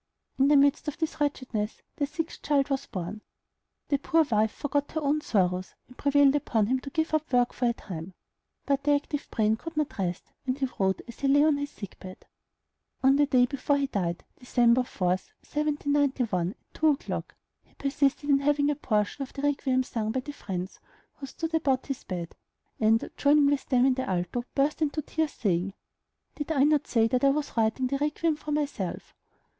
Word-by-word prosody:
In 270 - +5
the 295 0 +6
midst 280 +2 +3
of 295 - -3
this 320 -2 -3
wretchedness 250 -7 -2
their 285 - 0
sixth 325 +3 -5
child 285 -1 +1
was 270 - -1
born. 185 +3 -5 0.7
The 280 - +2
poor 325 +3 +3
wife 220 -6 +2
forgot 290 0 -2
her 315 - 0
own 295 +1 +1
sorrows, 185 -6 0
and 250 - -16
prevailed 280 0 +4
upon 225 -7 +1
him 255 +4 +1
to 275 - -8
give 320 +2 -1
up 310 -2 0
work 245 -1 +3
for 250 - -1
a - - +1
time; 180 -4 -8 0.5
but 280 -1 +1
the 290 0 +4
active 290 0 -3
brain 220 0 +1
could 330 +5 -8
not 300 -8 -1
rest, 180 -2 -3 0.2
and 255 +1 0
he 275 - 0
wrote 190 -1 +1
as 235 - -11
he 275 - 0
lay 285 +2 +5
on 305 -2 +4
his 285 0 -3
sick 200 -8 -10
bed. 185 0 -11 0.8
On 270 +1 +6
the 290 0 +3
day 255 -3 +4
before 280 +2 0
he 280 - +1
died, 180 -10 -2 0.2
Dec. 245 0 +3
4, 185 -7 -2
1791, 280 - 0
at 195 - -10 0.2
two 315 - +1
o'clock, 295 -2 -1 0.3
he - - -31
persisted 280 +1 0
in 280 -1 +4
having 290 +1 +2
a - - -1
portion 215 -2 -1
of 270 - -4
the 275 - -6
"Requiem" 270 -3 +1
sung 225 -4 -3
by 260 +2 -1
the 290 - -7
friends 185 -7 -5 0.4
who 275 - -7
stood 325 +4 -5
about 275 -5 +1
his 275 -3 -5
bed, 175 -3 -5 0.4
and, 220 +1 +3
joining 290 0 +5
with 280 -1 +1
them 255 -2 +4
in 265 - +4
the 260 -3 -3
alto, 180 +6 -1
burst 290 +3 +1
into 305 0 0
tears, 315 0 -1
saying, 195 -2 -1 0.6
"Did 295 +1 -4
I 275 -4 +3
not 295 0 +3
say 225 -2 +3
that 250 +3 0
I 275 - +6
was 295 +1 -1
writing 225 +3 +1
the 275 +2 -1
'Requiem' 300 +2 0
for 300 - -6
myself?" 285 - -3
275 Hz, 200 wpm, -28 LUFS, 220-290 Hz, 0.8 s, the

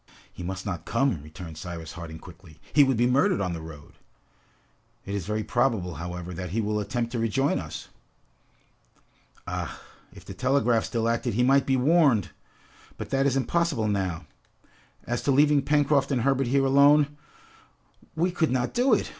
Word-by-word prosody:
"He - - -10
must 95 +2 -5
not 90 -5 -4
come!" 115 - 0
returned 80 +1 -10
Cyrus 85 -1 -7
Harding 80 -2 -8
quickly. 85 -1 -15
"He 145 - +7
would 135 -3 +1
be 120 - +3
murdered 140 +10 +2
on 90 -3 -1
the 80 - -6
road!" 75 -3 -12 1.1
"It 100 - -5
is 100 -3 -3
very 105 +1 -1
probable, 115 -9 0
however, 90 +2 -6
that 90 +1 -5
he 105 +7 -2
will 105 -1 -1
attempt 115 +2 -2
to 120 - -2
rejoin 115 +5 +1
us!" - - -8 1.6
"Ah, - - -5 0.3
if - - -15
the - - -8
telegraph 130 -3 +1
still 115 -1 -1
acted, 115 -1 -1
he 125 - +2
might 135 +2 +3
be 135 -1 +2
warned! 140 - +3 0.7
But - - -7
that 135 0 +2
is 135 -1 +1
impossible 135 -3 0
now! 95 -5 -2 0.8
As 120 0 -2
to 140 - +1
leaving 145 +1 +4
Pencroft 145 -1 +2
and 130 -3 +1
Herbert 135 -1 +1
here 135 +2 +2
alone, 145 +2 +5 1.0
we 175 +3 +1
could 170 -2 0
not 125 -1 -1
do 245 -1 +4
it! - - -2
120 Hz, 170 wpm, -26 LUFS, 90-140 Hz, 1.6 s, He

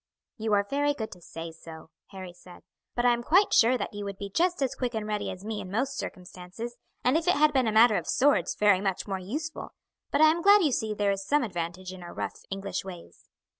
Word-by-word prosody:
"You 220 -1 -1
are 200 0 +4
very 290 +4 0
good 220 -5 -5
to 180 - -12
say 165 0 -8
so," 160 0 -12 0.2
Harry 185 -2 -9
said; 180 0 -15 0.3
"but 240 - 0
I 245 - +6
am 240 - -2
quite 370 +11 +3
sure 245 +3 +5
that - - -4
you 205 0 -5
would 200 -1 -6
be 200 0 -7
just 350 - +1
as 265 -1 -1
quick 250 -3 -3
and 220 -1 -2
ready 210 -1 -2
as 185 +2 -8
me 215 -1 -3
in 185 - -8
most 250 +8 -1
circumstances, 185 +6 -7 0.3
and 250 +3 +3
if 325 +2 0
it 360 - +4
had 300 0 +4
been 260 -4 +2
a - - +1
matter 220 0 +6
of - - -4
swords, 260 - +2
very 205 -3 +4
much 195 0 -2
more 195 -1 -2
useful; 300 - -6 0.3
but - - 0
I 310 0 +7
am 335 +2 -2
glad 405 +1 +6
you 300 - +2
see 220 -3 -1
there 205 -1 +1
is 195 0 -3
some 290 +7 +2
advantage 180 -2 -5
in 185 - -10
our 175 - -10
rough - - -4
English 195 0 -4
ways." 180 -3 -12
210 Hz, 245 wpm, -28 LUFS, 185-265 Hz, 0.3 s, I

